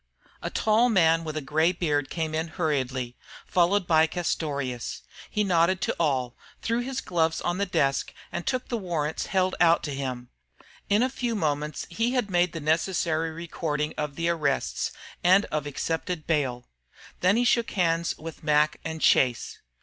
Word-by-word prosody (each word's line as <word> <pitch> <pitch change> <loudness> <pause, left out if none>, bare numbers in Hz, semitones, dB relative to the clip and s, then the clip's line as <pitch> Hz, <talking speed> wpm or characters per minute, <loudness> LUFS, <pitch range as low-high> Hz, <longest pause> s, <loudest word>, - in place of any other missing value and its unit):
A - - -3
tall 220 +3 +3
man 165 -6 +4
with 155 -1 -4
a - - -1
gray 160 +4 +3
beard 150 -6 -1
came 160 -2 -3
in 160 +1 -1
hurriedly, 135 -7 -2 0.3
followed 185 +2 +2
by 160 -1 +4
Castorious. 140 - -3 0.3
He 210 - 0
nodded 180 -1 +3
to - - 0
all, 130 -6 0 0.3
threw 230 +1 +1
his 255 +1 -3
gloves 165 -2 0
on 175 +2 -2
the 200 - 0
desk, 135 -6 +1 0.2
and - - -3
took 255 -1 -1
the 235 - -2
warrants 160 -5 -2
held 185 -1 +1
out 170 -1 +5
to 145 - -3
him. 130 -3 -4 0.6
In 205 +4 +4
a - - +3
few 245 -3 -2
moments 150 -4 -1
he 230 +8 0
had 245 -6 0
made 175 -1 +3
the 165 - -4
necessary 160 +1 +1
recording 160 -2 -3
of 150 -2 -3
the 170 0 -1
arrests 165 -3 0 0.3
and 190 +3 +5
of 150 -1 -1
accepted 160 +3 -3
bail. 130 -6 -1 0.5
Then 185 +4 +3
he 245 - +2
shook 235 -1 +3
hands 170 -3 0
with 160 0 -9
Mac 150 0 +3
and 160 -1 -5
Chase. 125 -3 +2
165 Hz, 170 wpm, -26 LUFS, 150-185 Hz, 0.6 s, out